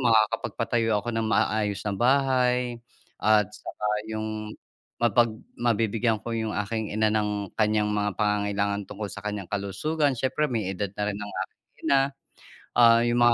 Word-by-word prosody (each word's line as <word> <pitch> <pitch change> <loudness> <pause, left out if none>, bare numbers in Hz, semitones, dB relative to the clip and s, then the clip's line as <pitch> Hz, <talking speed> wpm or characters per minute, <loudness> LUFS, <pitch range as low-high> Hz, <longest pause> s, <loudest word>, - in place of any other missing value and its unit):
makakapagpatayo 115 -1 +2
ako 120 - -6
ng 115 -1 0
maayos 105 -2 +1
na 100 - 0
bahay 125 0 +2 0.4
at 105 -2 +5
saka 105 - -6 0.2
'yong 110 0 -4 0.5
mapag 120 0 +4 0.3
mabibigyan 115 -1 +1
ko 115 - -3
'yong 110 -2 -2
aking 110 0 -3
ina 110 0 +3
ng 105 -2 -1
kanyang 105 -1 +2
mga 105 -1 0
pangangailangan 100 -1 0
tungkol 105 - -5
sa 100 - -8
kanyang 105 -3 -4
kalusugan, 130 +9 0
siyempre 130 +4 +1
may 110 -6 -1
edad 100 +1 -3
na 105 - 0
rin 105 -1 -2
ng 105 0 -6
aking - - -47 0.3
ina. 135 -1 +5 0.8
Ah, 115 -1 +7
'yong 120 0 +1
mga 120 0 +6
110 Hz, 155 wpm, -26 LUFS, 105-120 Hz, 0.8 s, Ah